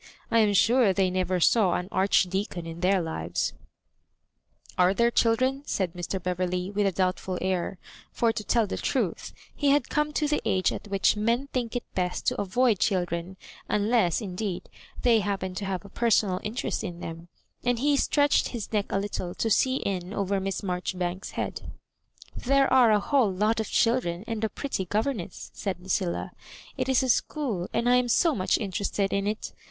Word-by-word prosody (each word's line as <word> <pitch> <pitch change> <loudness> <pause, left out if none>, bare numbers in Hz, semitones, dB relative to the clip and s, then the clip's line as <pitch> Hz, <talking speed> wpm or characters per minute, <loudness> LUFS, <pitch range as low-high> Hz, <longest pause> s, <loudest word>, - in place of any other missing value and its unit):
I 230 - +4
am 210 -2 +3
sure 230 0 +4
they 185 -1 +1
never 185 0 0
saw 190 0 +4
an 180 - -3
Archdeacon 190 -2 +1
in 165 0 -7
their 185 0 +2
livesL*' 85 - -2 1.2
"Are 180 +2 +3
there 235 +2 +3
children?" 255 +4 +2
said 185 -4 -1
Mr. 180 +2 -4
Beverley, 180 +1 -2
with 205 0 +1
a - - +1
doubtful 185 0 -1
air; 185 0 -1 0.3
for, 230 -1 +2
to 215 - -4
tell 230 +1 +2
the 195 - -4
truth, - - -2 0.2
he 285 - +1
had 290 +1 +2
come 300 0 0
to 300 0 +1
the 295 0 0
age 185 -1 +1
at - - -6
which 195 0 +2
men 235 +6 0
think 245 -2 -2
it 245 - -1
best 180 -1 -2
to - - +1
avoid 215 +2 +2
children, 175 -1 -1 0.3
unless, 210 -4 +2
indeed, 195 -1 -4 0.3
they 235 -2 +5
happen 195 -2 -2
to 195 +2 -4
have 190 0 -3
a - - -11
personal 210 -4 +2
interest 220 +3 -3
in 175 -4 -6
them; 165 0 -7 0.4
and 245 -1 +1
he 285 +4 +2
stretched 285 +1 +2
bis 230 -2 -5
neck 205 -2 +1
a - - +1
little 195 -3 -4
to 225 - -1
see 260 +4 +3
in 190 -4 -3
over 200 0 0
Miss 195 +1 -3
r - - -4
Maijoribanks*8 180 +1 -3
head. - - -4 0.6
"There 275 +1 +2
are 250 -3 +6
a 210 -1 +4
whole 245 -1 +2
lot 210 +4 +1
of 220 - -2
children 230 -7 +1
and 225 -2 -4
a 220 - +1
pret 280 +4 -6
ty 190 - 0
governess," 210 -1 -3
said 195 -3 -4
Lucilla. 180 -1 -2 0.2
" - - -18
It - - -2
is 265 -1 +3
a 260 - -1
school, 230 - 0
and 235 - 0
I 250 0 +5
am 250 -1 +1
so 330 +6 +3
much 185 -7 +1
interested 200 -1 -2
in 200 0 0
it. 215 +1 -3
200 Hz, 190 wpm, -27 LUFS, 185-235 Hz, 1.2 s, are